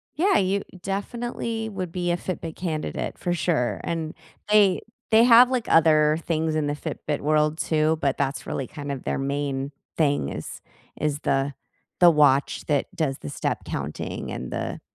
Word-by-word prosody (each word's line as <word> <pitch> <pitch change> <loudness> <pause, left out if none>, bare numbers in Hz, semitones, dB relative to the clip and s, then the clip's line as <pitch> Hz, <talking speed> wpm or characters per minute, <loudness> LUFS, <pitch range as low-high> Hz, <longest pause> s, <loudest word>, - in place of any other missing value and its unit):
Yeah, 385 +6 +3
you 195 +1 +1 0.2
definitely 225 +2 -3
would 185 -4 -5
be 175 0 -1
a 175 - +1
Fitbit 165 -3 -5
candidate 160 -4 -3
for 175 - -1
sure. 160 -8 0
And, 160 -2 -3 0.4
they 205 -3 +5 0.3
they 225 +1 +7
have, 245 +1 +8
like, 245 -3 -1
other 155 -1 +5
things 160 -1 0
in 150 -2 0
the 145 - -1
Fitbit 150 0 -4
world 150 +1 +2
too, 155 0 +1
but 140 -1 +1
that's 140 0 -2
really 135 - -3
kind 145 -2 -6
of 135 -2 -5
their - - -1
main 140 0 -2 0.3
thing 145 - +2
is - - -7 0.4
is 150 -1 -1
the 135 +1 0 0.5
the 175 -1 +8
watch 145 -3 +3
that 145 -3 +1
does 140 -5 -1
the 75 - -7
step - - -2
counting 75 +2 -4
and 65 - -5
the, - - -3
155 Hz, 170 wpm, -25 LUFS, 145-185 Hz, 0.5 s, have